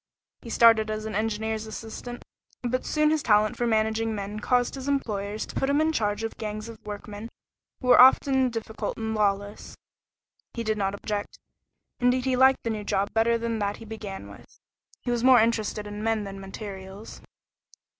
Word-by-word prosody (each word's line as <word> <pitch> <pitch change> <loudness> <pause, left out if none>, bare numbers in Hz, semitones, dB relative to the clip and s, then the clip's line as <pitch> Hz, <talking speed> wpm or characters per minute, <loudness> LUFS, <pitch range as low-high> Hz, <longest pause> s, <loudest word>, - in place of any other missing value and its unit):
He 235 - -10
started 225 -1 +5
as 215 0 -3
an 220 - -4
engineer's 220 +1 -2
assistant, 225 +2 -7 0.4
but 250 +1 -1
soon 305 0 +2
his 310 -1 +1
talent 210 -2 +3
for 240 - -1
managing 220 0 +1
men 205 +1 -5
caused 245 +2 +1
his 270 0 -6
employers 215 -7 -2
to - - -10
put 270 - 0
him 285 +1 +3
in 315 +1 +2
charge 210 -6 -1
of 225 - -4
gangs 215 0 -4
of 230 -1 -11
workmen 210 +1 -7 0.5
who 250 - -2
were 250 - +9
often 265 0 +5
difficult 225 -1 -4
and 220 0 -3
lawless. 205 -1 -1 0.8
He 235 - -3
did 215 -1 -1
not 195 0 0
object; 205 0 -4 0.6
indeed 250 0 +2
he 260 -1 +2
liked 265 +1 +4
the 230 - -1
new 215 -1 -4
job 200 0 -1
better 230 +1 +3
than 230 -1 -2
that 205 0 -1
he 225 - -11
began 215 -3 -7
with. - - -16 0.4
He 245 - -2
was 240 -1 0
more 255 -1 +7
interested 220 -2 0
in 205 0 -6
men 225 -1 0
than 195 -1 -7
materials. 195 +1 -9
220 Hz, 185 wpm, -26 LUFS, 210-240 Hz, 0.8 s, were